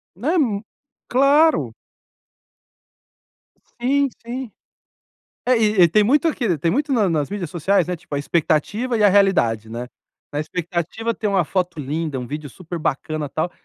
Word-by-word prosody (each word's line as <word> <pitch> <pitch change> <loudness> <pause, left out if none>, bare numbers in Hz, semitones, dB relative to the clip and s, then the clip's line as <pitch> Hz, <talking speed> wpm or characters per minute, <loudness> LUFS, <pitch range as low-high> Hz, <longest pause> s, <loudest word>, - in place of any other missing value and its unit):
Né, 280 - 0
um 230 - +1 0.5
claro. 285 +5 +4 2.1
Sim, 275 +3 +2 0.2
sim. 245 +1 -5 1.0
É 250 0 +4
e 215 -3 +3
e 170 - +7
tem 210 +5 +3
muito 290 +8 +3
aqui, 235 - 0
tem 165 +3 0
muito 285 +4 0
na 215 -6 +2
nas 150 -4 0
mídias 195 -5 -4
sociais, 175 +3 +1
né, 180 - -2
tipo, 160 -3 -8
a - - 0
expectativa 185 - 0
e 210 - +2
a 205 - +7
realidade, 150 - +2
né, 120 +2 -5 0.4
na 145 - -2
expectativa 175 +7 -3
tem 215 -2 -2
uma 195 -3 +2
foto 175 -1 -2
linda, 150 +1 -3
um 125 - -5
vídeo 150 +1 -6
super 170 +4 -7
bacana, 155 +1 -2
tal, 165 +4 -2
185 Hz, 160 wpm, -21 LUFS, 155-235 Hz, 2.1 s, e